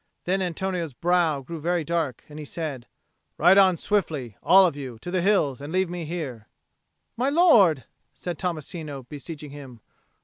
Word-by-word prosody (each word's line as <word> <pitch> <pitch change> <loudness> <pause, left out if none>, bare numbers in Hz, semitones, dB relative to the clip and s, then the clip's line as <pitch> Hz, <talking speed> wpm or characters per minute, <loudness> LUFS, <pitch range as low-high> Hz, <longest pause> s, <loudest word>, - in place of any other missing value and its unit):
Then 190 +2 0
Antonio's 180 -3 -2
brow 170 0 +1
grew 165 +4 -8 0.2
dark 165 -4 -2
and 150 0 -10
he - - -6
said, 145 -5 -5 0.5
"Ride 180 +5 +6
on 190 -3 +5
swiftly, 155 - -1
all 190 0 +7
of 170 - 0
you, 130 -5 -7
to 175 +10 -7
the 185 -1 +1
hills, 160 -9 +2
and 145 +2 -7
leave 185 0 0
me 175 -2 -4
here." 140 -10 -5 0.7
"My 255 +3 +1
lord!" 225 - +5 0.3
said 175 -3 -6
Tommasino, 155 -4 -4
beseeching 150 0 -8
him. 135 -5 -11
165 Hz, 160 wpm, -25 LUFS, 145-180 Hz, 0.7 s, all